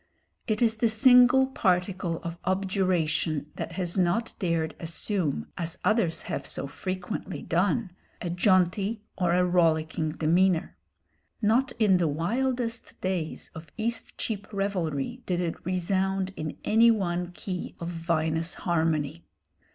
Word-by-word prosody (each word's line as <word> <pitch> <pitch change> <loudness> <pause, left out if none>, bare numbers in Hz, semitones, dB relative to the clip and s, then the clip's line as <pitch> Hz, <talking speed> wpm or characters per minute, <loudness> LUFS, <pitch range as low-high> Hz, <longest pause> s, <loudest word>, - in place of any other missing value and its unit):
It 215 0 +1
is 225 -1 +2
the 230 - +3
single 250 +3 +6
particle 180 -7 0
of 170 0 -5
objuration 180 -5 0
that 165 - -5
has 180 +1 -1
not 185 +6 +1
dared 165 -3 0
assume, 165 - -2
as 165 -1 -3
others 210 -7 +2
have - - -3
so - - -1
frequently 185 +1 -5
done, 190 +4 +1 0.3
a 175 - -3
jaunty 190 +3 +2
or 180 -3 +1
a 180 +1 +3
rollicking 160 -3 +1
demeanour. 170 +2 +2 0.6
Not 235 +5 +2
in 210 -5 +4
the 170 -2 +2
wildest 235 - -2
days 180 -4 -3
of 160 -2 -10
Eastcheap 225 -2 -3
revelry 195 - -2
did 180 -1 0
it 170 -2 -3
resound 190 +1 0
in 155 -1 -5
any 230 +2 +5
one 180 -5 0
key 180 0 -6
of 170 - -4
vinous 165 -1 -1
harmony. 160 -2 -1
180 Hz, 130 wpm, -27 LUFS, 165-210 Hz, 0.6 s, single